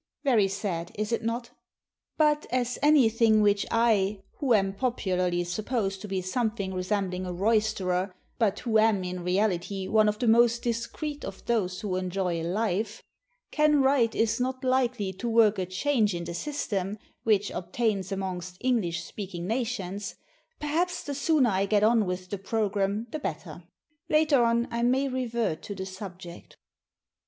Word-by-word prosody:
Very 235 -8 +4
sad 185 -4 -3
is 215 +2 -2
it 230 - 0
not? 235 +1 -3 0.7
But, 300 -1 +2
as 250 -1 -1
anything 230 -7 +5
which 205 -1 +2
I 210 -4 +2 0.2
who 260 -5 +3
am 195 -2 +1
popularly 185 -7 0
supposed 195 +1 -2
to 210 - -6
be 190 -2 -2
something 205 -1 -2
resembling 185 0 -2
a - - -3
roysterer, 195 -2 +1 0.3
but 215 -4 +1
who 225 -3 +2
am 215 -3 +3
in 180 0 -4
reality 190 0 0
one 215 0 +4
of 210 - -2
the 240 - -1
most 235 +1 +4
discreet 245 +6 -3
of 195 0 -8
those 190 -6 0
who 190 -3 -2
enjoy 180 -2 -1
life 205 +4 -1 0.5
can 300 -2 +3
write 265 -4 +3
is 225 +2 +1
not 255 +1 -2
likely 245 -7 +1
to 235 +6 -4
work 220 -3 +4
a 185 - -2
change 210 +1 +1
in 170 - -4
the 170 0 -5
system 205 - -3 0.2
which 210 -2 +2
obtains 195 +1 -2
amongst 185 -2 -4
English 215 -10 0
speaking 185 -4 -6
nations, 205 -3 -3 0.4
perhaps 340 +4 -1
the 285 - -4
sooner 285 -4 +2
I 195 +1 +1
get 205 0 +3
on 220 -2 +4
with 180 0 -4
the 200 - -3
programme 205 0 -1
the 310 - -3
better. 165 - -6 0.4
Later 305 -4 +4
on 235 0 +2
I 235 0 -1
may 260 +3 +2
revert 235 -8 -2
to 205 - -6
the 190 0 -5
subject. 185 -2 -9
210 Hz, 160 wpm, -27 LUFS, 190-235 Hz, 0.7 s, anything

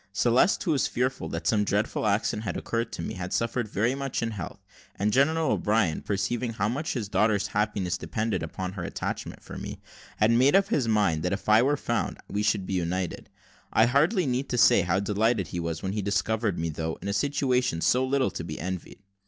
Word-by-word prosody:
Celeste, 120 - +3
who 175 - 0
was 140 -4 +2
fearful 130 +2 -2
that - - -5
some 110 -3 +3
dreadful 105 +2 0
accident 105 +1 0
had 105 - -3
occurred 115 0 -2
to 85 - -5
me, - - -4
had 90 0 -5
suffered 115 0 -1
very 110 +4 0
much 135 -3 -3
in 115 - -1
health, 100 -6 -7 0.3
and 105 +2 0
General 155 +2 +3
O'Brien, 105 -7 +1
perceiving 115 +4 -2
how 105 -1 0
much 140 +8 -2
his 115 -6 -3
daughter's 105 -1 +1
happiness 100 -3 -1
depended 110 -5 -2
upon 90 +3 -4
her 95 -3 -6
attachment - - -5
for - - -8
me, - - -7 0.4
had 110 +2 +4
made 130 +6 +4
up 195 0 +4
his 130 -6 +1
mind 105 -8 +2
that 90 +2 -1
if 100 - -5
I 110 +1 +6
were 145 +3 +2
found, 120 -5 -2
we 105 - -2
should 105 -2 +1
be 95 - -4
united. 90 0 -2 0.4
I 110 - +5
hardly 155 - +3
need 130 +1 -1
say 110 -3 +6
how 90 +2 +1
delighted 105 -2 +1
he 90 - -4
was 85 -1 -3
when 95 - -1
he 105 - -1
discovered 100 +1 0
me, 80 0 -1
though 80 +1 -3
in - - -7
a 100 - -1
situation 125 - +1
so 125 +9 +3
little 130 0 +1
to - - -5
be 80 -2 -6
envied. 95 +3 -6
105 Hz, 210 wpm, -27 LUFS, 95-125 Hz, 0.4 s, I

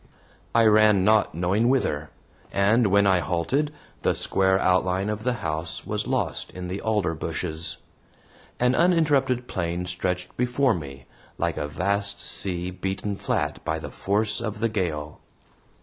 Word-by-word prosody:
I 115 -1 +5
ran 105 -2 +5
not 105 -4 +3
knowing 95 +7 +1
whither, 80 - 0 0.4
and 105 +4 +3
when 100 +1 +4
I 95 -2 +4
halted, 110 - 0 0.3
the - - +1
square 95 0 +2
outline 95 +2 +1
of 105 0 -5
the 125 0 +1
house 80 +1 -3
was - - -2
lost - - -1
in 90 -1 -6
the 95 +2 -4
alder 105 -6 0
bushes. 80 0 -3 0.8
An 125 +1 +3
uninterrupted 145 -7 +2
plain 85 -1 -2
stretched 90 0 -2
before 125 +1 +2
me, 70 -5 -7 0.3
like - - -1
a 75 - -2
vast 100 +5 0
sea 90 -1 0
beaten 95 +2 -3
flat - - -2
by 80 - -1
the 80 - -7
force 105 +3 -1
of 105 -2 -4
the 115 +1 +1
gale. 80 -8 -3
95 Hz, 150 wpm, -25 LUFS, 90-110 Hz, 0.8 s, I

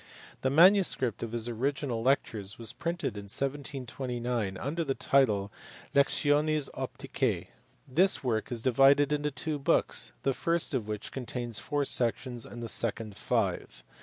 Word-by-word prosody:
The 130 - +1
manuscript 165 - +4
of 115 - -4
his 120 0 +1
original 125 0 -2
lectures 110 -6 0
was 115 -3 -5
printed 170 - -3
in 100 - -7
1729 125 -4 -3
under 150 - -2
the 135 -3 -2
title 105 -8 +2 0.4
Lectiones 145 +1 +2
Opticae. - - -3 0.4
This 175 +8 +4
work 115 -2 -1
is 115 -2 -2
divided 135 +3 +4
into 150 0 0
two 150 +2 -3
books, 135 - +1
the 135 - +1
first 170 +3 0
of 120 -6 -1
which 105 0 -5
contains 120 -3 -3
four 145 -1 -1
sections 120 -1 -1
and 120 0 -8
the - - -4
second 110 -2 0
five. 110 -4 -2
130 Hz, 140 wpm, -29 LUFS, 115-145 Hz, 0.4 s, manuscript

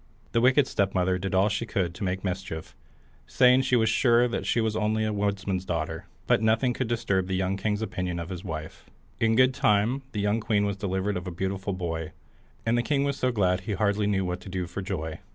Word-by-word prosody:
The 115 - +2
wicked 130 +3 +5
stepmother 95 -4 0
did 95 +1 -2
all 95 +2 +4
she 105 +2 -2
could 90 -5 -1
to 90 - -7
make 95 0 -2
mischief, 90 -4 -5 0.5
saying 125 +1 +5
she 130 -1 +1
was 110 -2 +3
sure 120 +1 +3
she - - +1
was 110 -1 0
only 110 0 +1
a 110 - -1
woodman's 100 -2 -1
daughter; 80 -2 -3 0.2
but - - +3
nothing 115 +3 +2
could 130 0 -2
disturb 100 -5 0
the 95 - -1
young 95 +1 0
king's 105 +2 -1
opinion 90 -4 -3
of 85 0 -5
his 90 -1 -6
wife. 80 -4 -7 0.3
In 115 0 +3
good 130 +2 +5
time 125 -1 +2
the 105 - -3
young 105 +2 +1
queen 105 -2 +1
was 100 -1 -2
delivered 95 0 -1
of 90 +1 -6
a - - -3
beautiful 95 +3 -3
boy, 80 -3 -4 0.5
and 115 +1 +2
the 120 - +3
king 140 +3 +1
was 140 -1 0
so 130 - +1
glad 95 -5 +2
he 105 +3 -3
hardly 100 +1 +1
knew 95 -2 +1
what 90 0 -3
to 95 - -10
do 90 -1 -2
for 85 +3 -6
joy. 80 -4 -4
100 Hz, 225 wpm, -27 LUFS, 90-115 Hz, 0.5 s, wicked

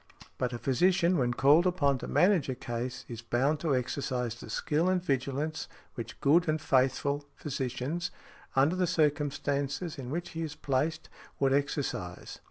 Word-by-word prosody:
But 125 -1 0
a 120 - -3
physician, 175 +8 +3
when 120 -1 +1
called 150 +8 +5
upon 145 -7 +2
to - - -6
manage 180 -7 +3
a 130 - -1
case, 120 +1 -4
is 115 -1 -7
bound 130 +6 +1
to 155 -4 +1
exercise 125 -1 -1
the 115 - -11
skill 155 +9 +1
and 185 0 +2
vigilance 145 -1 -2 0.3
which 115 0 -7
good 165 +4 +4
and 155 0 +1
faithful 140 +1 +1
physicians, 135 +4 -3 0.5
under 140 +6 +4
the 185 -1 +1
circumstances 145 -1 0
in 125 -2 -6
which 170 +5 -3
he 165 - -5
is 155 -2 -4
placed, 150 +2 -1 0.3
would 135 -1 +3
exercise. 140 - -2
140 Hz, 160 wpm, -30 LUFS, 130-160 Hz, 0.5 s, called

